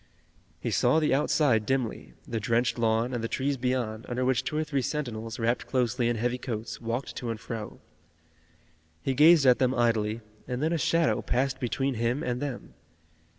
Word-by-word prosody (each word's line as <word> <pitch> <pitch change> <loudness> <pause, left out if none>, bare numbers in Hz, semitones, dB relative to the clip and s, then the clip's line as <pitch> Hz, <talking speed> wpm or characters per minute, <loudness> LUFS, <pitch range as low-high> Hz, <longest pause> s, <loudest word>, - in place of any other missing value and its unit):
He - - -3
saw 160 - +3
the 155 - +2
outside 135 -5 +3
dimly, 125 0 -2
the 115 - -2
drenched 115 +3 +1
lawn, 115 +2 +1
and 120 -2 -2
the - - 0
trees 140 +4 -1
beyond, 120 -4 -2
under 125 +1 -1
which 130 -1 +2
two 150 - -3
or 155 - +1
three 145 -3 -1
sentinels, 115 -6 -4
wrapped 120 +1 0
closely 125 -1 +1
in 120 - 0
heavy 120 +3 -1
coats, 115 -3 -5
walked 120 +3 -3
to 120 - -4
and 115 -1 -3
fro. 110 -2 -6 1.2
He 135 - 0
gazed 150 +2 +6
at 125 -1 +6
them 130 0 +2
idly, 115 -2 +1 0.3
and 125 0 -3
then 160 +2 +1
a - - +1
shadow 165 +2 +2
passed 130 +1 0
between 135 +2 -1
him 120 +4 -1
and 125 0 -2
them. 140 -4 -5
125 Hz, 185 wpm, -28 LUFS, 115-135 Hz, 1.2 s, gazed